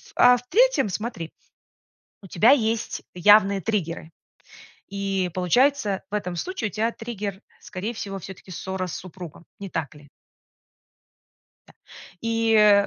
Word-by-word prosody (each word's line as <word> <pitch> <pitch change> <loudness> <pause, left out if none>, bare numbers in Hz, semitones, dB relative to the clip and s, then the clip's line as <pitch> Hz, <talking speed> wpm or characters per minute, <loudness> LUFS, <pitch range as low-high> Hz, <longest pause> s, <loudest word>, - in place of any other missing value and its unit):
а 245 0 +7
в 240 - -11
третьем, - - +4
смотри, 190 -4 -4 0.9
у - - -11
тебя 220 +9 +5
есть 225 -4 0
явные 200 +1 +5
триггеры. 170 -6 -2 0.8
И 195 -2 -1
получается, 210 - +2
в - - -6
этом 180 -4 -2
случае 360 - -3
у - - -26
тя 225 +2 0
триггер, 210 -5 -5 0.2
скорее 210 +4 -5
всего, 195 -3 -5
всё-таки 190 +1 -11
ссора 190 +1 -4
с - - -5
супругом, 175 -2 -10 0.2
не 195 - -6
так 160 -3 -3
ли? 145 -1 -16 1.6
Да. - - -18 0.5
И 220 -3 +4
200 Hz, 130 wpm, -24 LUFS, 185-225 Hz, 1.6 s, а